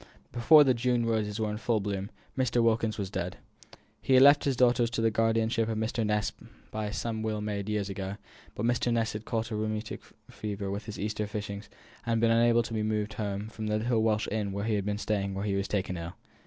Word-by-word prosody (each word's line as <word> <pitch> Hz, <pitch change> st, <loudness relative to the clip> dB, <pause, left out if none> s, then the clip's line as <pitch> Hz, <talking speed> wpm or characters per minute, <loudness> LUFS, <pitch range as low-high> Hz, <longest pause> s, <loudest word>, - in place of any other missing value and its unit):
Before 150 Hz, +6 st, +7 dB
the 130 Hz, -2 st, +4 dB
June 120 Hz, 0 st, +1 dB
roses 110 Hz, -2 st, -1 dB
were 110 Hz, -1 st, 0 dB
in 105 Hz, -, -3 dB
full 115 Hz, 0 st, +1 dB
bloom, 100 Hz, -1 st, -3 dB, 0.3 s
Mr. 125 Hz, -2 st, +2 dB
Wilkins 110 Hz, -1 st, +1 dB
was 100 Hz, -2 st, -4 dB
dead. 90 Hz, -2 st, -3 dB, 0.6 s
He 130 Hz, -, +3 dB
had 130 Hz, -, +8 dB
left 145 Hz, +1 st, +7 dB
his 140 Hz, -2 st, +1 dB
daughter 120 Hz, -1 st, +4 dB
to 115 Hz, 0 st, -3 dB
the 115 Hz, 0 st, +3 dB
guardianship 115 Hz, 0 st, +1 dB
of 110 Hz, -, -1 dB
Mr. 110 Hz, +1 st, -1 dB
Ness 105 Hz, -1 st, 0 dB, 0.4 s
by 110 Hz, -1 st, -3 dB
some 110 Hz, +1 st, -3 dB
will 110 Hz, -1 st, -2 dB
made 105 Hz, -1 st, -3 dB
years 105 Hz, -2 st, -1 dB
ago; 95 Hz, 0 st, -4 dB, 0.4 s
but 105 Hz, -, -2 dB
Mr. 120 Hz, 0 st, +1 dB
Ness 115 Hz, -1 st, +1 dB
had 105 Hz, +1 st, -6 dB
caught 115 Hz, 0 st, -2 dB
a -, -, -1 dB
rheumatic 110 Hz, 0 st, -3 dB, 0.3 s
fever 100 Hz, -2 st, -4 dB
with 100 Hz, +3 st, -4 dB
his 110 Hz, -, -7 dB
Easter 105 Hz, +1 st, -2 dB
fishings, 105 Hz, -1 st, -5 dB, 0.3 s
and 115 Hz, -1 st, 0 dB
been 115 Hz, 0 st, +3 dB
unable 115 Hz, 0 st, +4 dB
to 115 Hz, -, -6 dB
be 110 Hz, -, 0 dB
moved 105 Hz, 0 st, -1 dB
home 100 Hz, 0 st, -3 dB
from 110 Hz, 0 st, -6 dB
the 105 Hz, 0 st, +1 dB
little 115 Hz, +1 st, +1 dB
Welsh 110 Hz, -1 st, +1 dB
inn 105 Hz, -2 st, -1 dB
where 100 Hz, +1 st, -2 dB
he 110 Hz, -, 0 dB
had 100 Hz, -2 st, 0 dB
been 105 Hz, 0 st, -1 dB
staying 100 Hz, -2 st, -1 dB
when 100 Hz, +1 st, -3 dB
he 100 Hz, -, 0 dB
was 100 Hz, 0 st, -1 dB
taken 95 Hz, -3 st, -1 dB
ill. 85 Hz, +1 st, -6 dB
110 Hz, 230 wpm, -29 LUFS, 105-115 Hz, 0.6 s, had